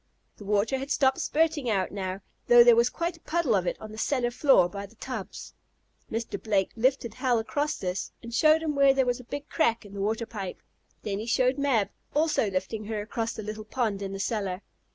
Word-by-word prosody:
The 205 - -11
water 210 +6 +1
had 270 +1 -6
stopped 265 -2 +2
spurting 310 -4 +1
out 195 -4 0
now, 190 -1 -4 0.3
though 240 0 +9
there 240 -1 +7
was 235 +1 +4
quite 340 +4 -3
a - - -25
puddle 320 -7 0
of 185 -2 0
it - - -2
on 215 - -9
the 215 - -8
cellar 245 -1 0
floor 240 - +4
by 200 +2 -7
the 220 - -22
tubs. 255 +3 -7 0.6
Mr. 225 -3 -3
Blake 200 -4 +1
lifted 245 -1 +1
Hal 250 -2 +1
across 290 +7 -1
this, 180 0 -3
and 235 0 -8
showed 310 +5 +4
him 310 -2 -1
where 275 -1 +5
there 265 -1 +3
was 245 0 0
a - - -10
big 285 +4 -6
crack 230 -8 +1
in 200 - -12
the 200 - -5
water 220 +3 -1
pipe. 195 -5 -7 0.4
Then 200 -1 -2
he 220 - -5
showed 255 +3 +2
Mab, 255 -8 +2 0.3
also 300 -8 +2
lifting 190 +3 -3
her 215 0 -3
across 225 +2 -3
the 220 - -7
little 215 +1 -6
pond 215 -3 -2
in 195 -1 -4
the 195 - -5
cellar. 195 -3 -2
230 Hz, 220 wpm, -27 LUFS, 205-265 Hz, 0.6 s, though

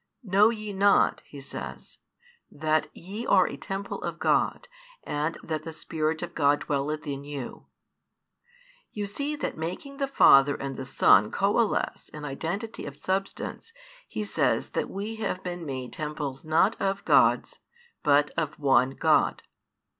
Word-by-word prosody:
Know 200 +1 +5
ye 215 -3 -5
not, 200 +1 +3
he 145 - -10
says, 135 - -8 0.5
that 155 +1 0
ye 200 +6 -7
are 185 -2 +5
a - - -5
temple 195 +7 -5
of - - -4
God, - - +1 0.4
and 150 +3 -2
that 155 -2 -3
the 160 - -7
Spirit 160 0 -2
of 175 0 -6
God 145 -1 +3
dwelleth 150 +2 -2
in 140 -1 -4
you? 140 -3 -7 1.2
You 205 -1 -3
see 280 +9 -3
that 290 - -4
making 185 - -5
the 275 -1 0
Father 140 - +6
and 135 -1 -5
Son 105 -5 +5
coalesce 205 - 0
in 150 -1 -8
identity 170 - -4
of 140 0 -8
Substance 195 - -3 0.3
he 215 - -4
says 205 - 0
that - - -2
we 210 +3 -5
have 190 -4 -3
been 175 -2 -5
made 130 -2 -5
temples 150 -3 -4
not 160 +7 +2
of 195 0 -1
Gods - - +3 0.4
but 145 0 +3
of 155 -2 -3
one 135 -2 +3
God. - - +2
160 Hz, 145 wpm, -27 LUFS, 145-200 Hz, 1.2 s, Father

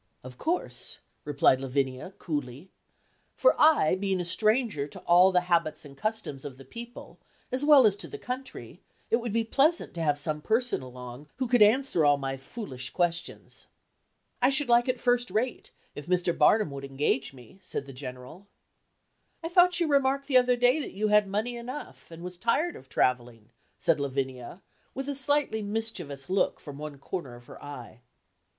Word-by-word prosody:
"Of 125 0 -11
course," 350 +3 -1 0.3
replied 140 -3 +3
Lavinia, 135 +5 -2
coolly, 145 +1 -5 0.6
"for - - +4
I, 305 - +5
being 190 -1 -1
a 175 - -2
stranger 215 - +1
to - - -10
all 180 +2 +5
the 180 -1 +3
habits 170 -4 0
and 140 -1 -12
customs 215 -9 -3
of 140 -3 -8
the 135 - -13
people, 235 - -10 0.3
as 255 +2 +1
well 290 -4 +7
as 205 -2 +4
to - - -5
the 425 - -8
country, 260 -6 -7 0.3
it 230 - +5
would 235 -2 -4
be 230 +2 +1
pleasant 285 +9 +1
to 170 - -5
have 145 -2 +1
some 150 +1 -1
person 230 - 0
along 125 +2 -10
who 260 -1 -2
could 245 -1 +3
answer 215 - +4
all 145 -1 +5
my 135 -1 -3
foolish 135 - -6
questions." 170 -2 -2 0.7
"I 250 - +5
should 275 -1 +1
like 240 +1 +4
it 255 -1 -1
first 245 -1 +1
rate, 225 +6 -2 0.2
if 145 - -9
Mr. 180 -1 +1
Barnum 165 +2 +4
would 140 0 -7
engage 135 0 -1
me," 130 - -16
said 180 -6 -5
the 135 - -10
General. 130 +8 -9 1.0
"I 330 - -3
thought 355 0 +4
you 340 - +2
remarked 275 -1 +2
the 270 -2 +4
other 250 0 +4
day 245 +4 +3
that 295 - -5
you 215 +2 -1
had 210 -1 +4
money 215 +5 -2
enough, 250 +5 -8
and 165 0 -11
was 180 0 -7
tired 300 - +1
of 130 - -14
travelling," 120 -3 -1 0.3
said 165 -3 +1
Lavinia, 135 +2 -4 0.3
with 270 +1 -4
a 285 - -1
slightly 280 -4 0
mischievous 200 -10 -4
look 190 +2 0
from 145 -1 -10
one 150 -2 -7
corner 140 -3 -6
of 120 0 -15
her - - -13
eye. 125 -5 -9
185 Hz, 180 wpm, -28 LUFS, -, 1.0 s, well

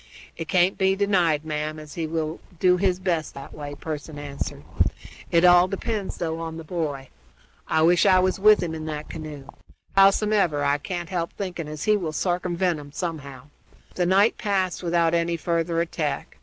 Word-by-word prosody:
"It 165 - -6
can't 180 +3 +2
be 190 0 +3
denied, 180 -7 +2
ma'am, 155 0 -3
as 155 -2 -10
he 165 0 -3
will 160 0 -3 0.2
do 180 -1 +4
his 185 -1 +1
best 175 -5 -2
that 140 0 -9
way," 145 -1 -7
Pearson 155 -1 -6
answered. 145 -1 -5 0.7
"It 170 +1 +4
all 175 0 +7
depends, 200 +1 -3
though, 165 -1 -3
on 165 -1 -5
the 165 - -7
boy. 150 -5 -4 0.6
I 160 - +2
wish 175 +3 +5
I 185 -1 +6
was 185 +1 +1
with 210 -1 +6
him 165 -2 -3
in 160 -1 -5
that 150 -1 -5
canoe. 155 -3 -7 0.5
Howsomever, 195 -5 +4
I 145 +1 +2
can't 175 +1 -5
help 170 -3 -2
thinking 180 -5 -5
as 150 -1 -6
he 215 0 +3
will 165 -6 -4
sarcumvent 175 -1 0
'em 145 -1 -11
somehow." 145 -5 -6 0.4
The 180 -1 0
night 200 +4 +3
passed 190 -3 0
without 170 -1 +2
any 170 0 +1
further 165 0 0
attack. 155 -4 -3
170 Hz, 180 wpm, -24 LUFS, 155-185 Hz, 0.7 s, all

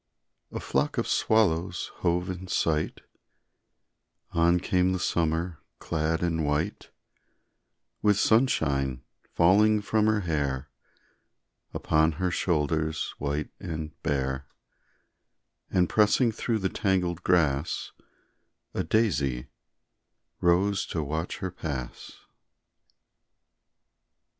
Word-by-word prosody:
A - - -4
flock - - -1
of - - 0
swallows 90 -5 +1
hove 90 +1 0
in 90 +1 -7
sight, 80 -3 0 1.3
On 85 +1 +3
came 90 +1 +1
the 95 - -1
summer 85 0 -1 0.2
clad 80 +1 -1
in 80 -2 0
white, 75 +1 -1 1.1
With 105 -2 +3
sunshine 70 - +2 0.3
falling 105 +5 +5
from 105 +1 +1
her 110 -1 +2
hair 70 -5 -2 1.0
Upon 80 +1 +2
her 90 +3 -1
shoulders 80 -2 0
white 75 +1 -2
and 80 -2 -5
bare, 65 -1 -1 1.2
And 90 -1 +2
pressing 110 +4 +3
through 115 +1 -1
the 95 -3 0
tangled 90 -4 0
grass, 75 -5 +1 0.8
A - - -1
daisy 75 - 0 0.9
rose 95 +3 +2
to 80 - -2
watch 80 +4 -3
her 95 - -3
pass. 70 -8 -6
85 Hz, 95 wpm, -27 LUFS, 75-95 Hz, 1.3 s, falling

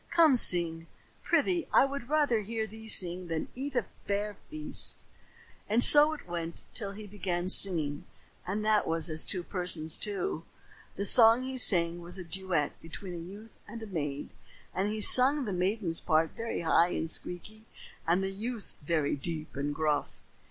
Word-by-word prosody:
Come 330 -5 +4
sing, 170 -6 +1 0.3
prythee. 355 -3 0
I - - +4
would 275 -2 -7
rather 290 -7 +1
hear 220 +2 -4
thee 220 +1 -13
sing 180 -3 +3
than 165 -1 -4
eat 270 +1 -7
a 240 -5 0 0.2
fair 205 +1 -3
feast." 310 0 -4 0.6
And 230 +3 +4
so 300 +1 +7
it 305 - -11
went 170 -1 -6
on - - -30
till 200 -4 -5
he 215 +1 -10
began 185 -3 -4
singing 160 -7 +3 0.4
and 210 +3 -3
that 215 -1 +1
was 165 0 +1
as 155 0 +3
two 185 -3 -1
persons, 175 -4 0
too. 195 -5 -3 0.5
The 200 - -4
song 230 +3 +5
he 260 0 -6
sang 175 -8 +5
was 175 +2 -6
a 185 - -7
duet 175 -3 -3
between 175 +3 -10
a - - -7
youth 200 +6 -12 0.2
and 225 +2 -9
a - - -6
maid, 150 -8 -5 0.4
and 195 +2 -2
he 215 0 -4
sung 265 +5 +7
the 205 - -4
maiden's 180 -1 -2
part 160 0 0
very 230 -4 -5
high 170 +1 +2
and 160 - -3
squeaky 215 +7 -4 0.4
and 175 +3 +1
the 190 - -3
youth's 220 +3 -4
very 150 -1 -1
deep 155 +2 -6
and 140 +1 -3
gruff. 150 -2 -2
190 Hz, 175 wpm, -28 LUFS, 165-225 Hz, 0.6 s, so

